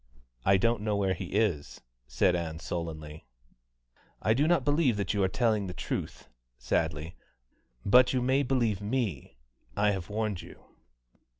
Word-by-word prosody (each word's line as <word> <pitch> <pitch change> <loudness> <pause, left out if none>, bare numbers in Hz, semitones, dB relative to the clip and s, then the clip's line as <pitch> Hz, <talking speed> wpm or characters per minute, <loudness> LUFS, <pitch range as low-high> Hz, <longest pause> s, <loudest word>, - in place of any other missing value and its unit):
"I 95 +6 +5
don't 115 +2 +1
know 105 -1 0
where 95 -2 +1
he 95 +1 -5
is," 100 -9 0 0.3
said 90 - +2
Ann 80 -2 -3
sullenly. 80 -3 -6 0.9
"I 110 - +2
do 145 +6 +2
not 175 0 +2
believe 145 -7 +2
you 100 - 0
are 95 - +3
telling 110 0 +1
the 90 - -6
truth" 70 - -5 0.3
(sadly); 75 +6 -2 0.7
"but 125 +5 +6
you 130 - +1
may 130 +3 +2
believe 120 -7 0
me, 105 - -3 0.4
I 105 0 +3
have 95 -4 -4
warned 105 -3 -2
you." - - -14
105 Hz, 145 wpm, -29 LUFS, 85-120 Hz, 0.9 s, but